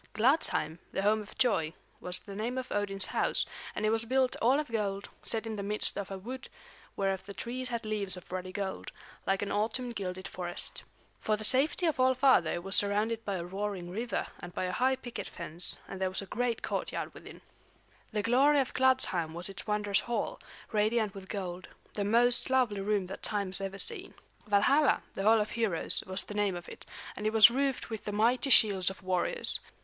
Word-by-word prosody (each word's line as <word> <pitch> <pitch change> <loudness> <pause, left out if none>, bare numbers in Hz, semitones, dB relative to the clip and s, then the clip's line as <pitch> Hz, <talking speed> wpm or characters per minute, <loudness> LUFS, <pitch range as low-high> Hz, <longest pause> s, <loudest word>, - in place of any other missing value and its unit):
Gladsheim, 215 - +2
the 195 - -2
home 215 +1 +3
of 210 - -13
joy, 175 -11 +2 0.3
was 180 0 -2
the 200 - -10
name 230 +5 -3
of 255 0 -4
Odin's 195 -2 -1
house, - - 0 0.3
and 215 - -1
it 215 - +3
was 225 0 +1
built 255 +2 +2
all 255 +5 +4
of 305 - -3
gold, 200 -3 -2
set 225 0 -1
in 220 -1 -4
the - - -3
midst 210 +1 0
of 200 -2 -4
a 195 - -5
wood 250 +6 -7 0.5
whereof 195 -1 -1
the 200 - -8
trees 250 +2 -2
had 235 -2 -3
leaves 205 -3 -1
of 180 - -13
ruddy 185 0 -4
gold, 195 0 -4 0.4
like 195 +1 +1
an 200 - -3
autumn 235 +4 -1
gilded 185 -3 -5
forest. 175 -1 -1 0.4
For 215 -1 0
the 215 - -7
safety 275 - +2
of 315 -5 +1
All 260 0 +4
Father 255 - +4
it 175 - -4
was 195 +1 +4
surrounded 215 +3 +2
by 200 - -2
a 170 -2 -4
roaring 190 -1 -4
river 230 +5 -2
and 175 - -9
by - - -1
a 180 - -1
high 260 +7 +2
picket 245 -2 -7
fence; 170 0 -2
and 195 -1 -7
there 190 - +2
was 190 +2 +2
a - - -8
great 235 +3 -2
courtyard - - -3
within. - - -12 0.7
The 210 -1 -1
glory 275 +6 +4
of 265 - -1
Gladsheim 185 -11 +2
was 175 +3 -3
its 195 +1 -8
wondrous 210 -1 +1
hall, 240 - -3 0.3
radiant 215 -1 +1
with 195 -2 -10
gold, 185 -3 -5 0.3
the 205 - -1
most 240 +5 +3
lovely 245 -6 +2
room 200 -1 0
that 190 +2 -8
time 200 -2 +1
has 190 +1 +1
ever 195 0 -4
seen. 390 - -2 0.3
Valhalla, 265 +9 +4
the - - -4
Hall 220 +3 +5
of 210 0 -1
Heroes, 220 -8 0
was 185 +1 0
the - - -8
name 205 -3 +1
of 175 -1 -8
it, - - -11 0.3
and 210 - -2
it 215 - 0
was 220 0 +9
roofed 270 -1 -1
with 220 - -5
the 210 - -2
mighty 235 +6 +2
shields 200 -7 +5
of 190 -1 -10
warriors. 185 - +1
210 Hz, 210 wpm, -31 LUFS, 190-240 Hz, 0.7 s, was